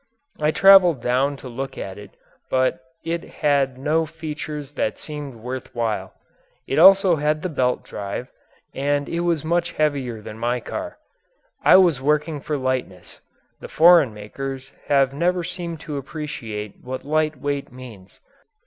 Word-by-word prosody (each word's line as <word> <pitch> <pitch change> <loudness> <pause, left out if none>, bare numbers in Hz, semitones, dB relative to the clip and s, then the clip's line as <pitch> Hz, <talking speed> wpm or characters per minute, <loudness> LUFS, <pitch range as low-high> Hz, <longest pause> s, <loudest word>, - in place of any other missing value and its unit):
I 150 0 +2
traveled 185 -3 +6
down 130 +4 0
to 135 - -10
look 130 +2 -6
at 95 +1 -6
it 105 - -13 0.3
but 130 0 +1 0.3
it 170 0 -2
had 140 -4 0
no 155 +4 0
features 150 -2 -6
that 145 - -2
seemed 150 -4 -7
worth 125 +3 -7
while. 110 -5 -2 0.5
It 135 - 0
also 190 -1 +7
had 150 +1 0
the 185 - -1
belt 125 -5 0
drive, 100 +5 -6 0.5
but 145 +1 0
it 170 - -3
was 170 -3 0
much 170 +1 0
heavier 140 -7 -1
than 105 +1 -10
my 120 +1 0
car. 310 - -6 0.7
I - - +7
was 170 -8 +4
working 150 +1 0
for 150 +1 -2
lightness; 130 -8 -4 0.4
the - - -8
foreign 165 -5 +6
makers 130 +6 -7 0.2
have 135 -2 +3
never 175 +4 0
seemed 170 -1 -5
to 150 -3 -5
appreciate 120 -8 -6
what 130 +1 -6
light 155 -1 0
weight 140 -1 -3
means. 120 -7 -13
145 Hz, 150 wpm, -22 LUFS, 125-155 Hz, 0.7 s, also